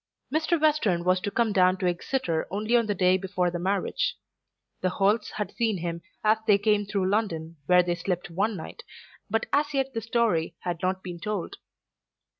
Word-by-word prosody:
Mr. 320 +2 +2
Western 290 - +2
was 185 +1 +3
to 205 - -3
come 225 0 +1
down 185 -1 +4
to 185 - -3
Exeter 175 -1 -1
only 215 +4 0
on 235 -2 +3
the 205 - 0
day 185 0 +4
before 185 -2 -1
the 175 - -3
marriage. 200 - 0 0.7
The 185 - +2
Holts 205 +3 +1
had 210 - -4
seen 225 -4 +1
him 170 0 -4 0.2
as 215 +1 +4
they 205 -2 +6
came 205 0 +1
through 195 -2 0
London 165 -7 -1
where 180 0 +6
they 175 0 0
slept 175 0 -3
one 200 +4 0
night, 170 - -8 0.5
but 225 +2 0
as 290 0 +1
yet 270 0 0
the 225 - -2
story 220 -8 0
had 175 -2 -3
not 185 +1 -1
been 175 -2 -6
told. 205 -1 -4
200 Hz, 190 wpm, -27 LUFS, 180-225 Hz, 0.7 s, they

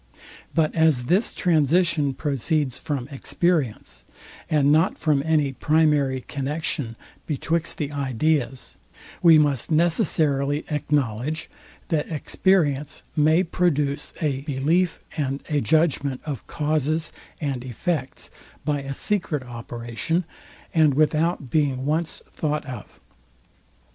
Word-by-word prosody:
But 160 -2 +2
as 160 -6 +3
this 185 - +2
transition 155 -3 +2
proceeds 145 -1 -1
from 140 -6 -3
experience, 145 -2 -1 0.5
and 145 -2 +3
not 160 +5 +3
from 150 -4 +2
any 150 -3 +1
primary 150 -3 +2
connexion 140 -3 -3 0.3
betwixt 165 +2 -1
the 145 -2 -3
ideas, 135 -1 -1 0.4
we 165 -3 +8
must 145 -5 +1
necessarily 155 -4 +1
acknowledge, 145 0 -1 0.4
that 155 -4 0
experience 150 -3 +1
may 155 +4 +4
produce 150 -5 0
a 145 -5 -1
belief 155 +6 +1 0.2
and 140 -2 -2
a 150 -2 +1
judgment 140 0 +1
of 145 -5 -5
causes 155 +2 -1 0.3
and 135 -5 -2
effects 130 +3 -3 0.3
by 145 -2 0
a 135 0 -5
secret 165 -8 -1
operation, 120 +7 -3 0.5
and 155 -4 +4
without 155 -2 +1
being 140 -4 +1
once 160 +3 -1
thought 150 -1 -2
of. 125 -7 -9
150 Hz, 110 wpm, -24 LUFS, 135-160 Hz, 0.5 s, we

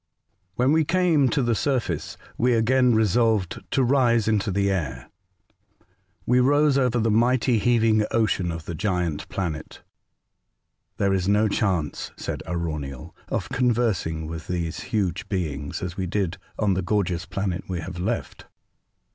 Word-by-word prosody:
WHEN 125 +4 +2
we 160 +1 +4
came 170 -5 +3
to 135 +3 +1
the 120 -1 +2
surface, 130 +2 -1 0.2
we 125 +1 +2
again 125 +1 +3
resolved 110 -3 +2
to 135 - +2
rise 120 -4 +3
into 110 -2 +1
the 100 +1 +1
air. 90 -5 -3 1.1
We 125 +1 +3
rose 145 +2 +4
over 125 -3 +2
the 115 -1 +1
mighty 120 +1 +3
heaving 115 -1 +3
ocean 105 -6 +1
of 80 -1 -6
the 85 - -5
giant 90 -3 -2
planet. 85 -5 -5 0.5
" - - -53
There 100 -1 +2
is 95 -1 0
no 105 +2 +3
chance," 95 -8 -1
said - - -4
Arauniel, 75 -6 -4
'' - - -27
of - - -6
conversing 110 -10 0
with 80 0 -7
these 85 -2 -3
huge 100 -7 -1
beings, 75 -8 -3
as 90 -1 -5
we 95 -1 -2
did 90 -1 -1 0.2
on 105 -3 +2
the 95 - 0
gorgeous 90 -2 -1
planet 95 -3 -3
we 90 -2 -3
have 90 +1 -7
left. 110 +6 -3
105 Hz, 155 wpm, -24 LUFS, 90-120 Hz, 1.1 s, we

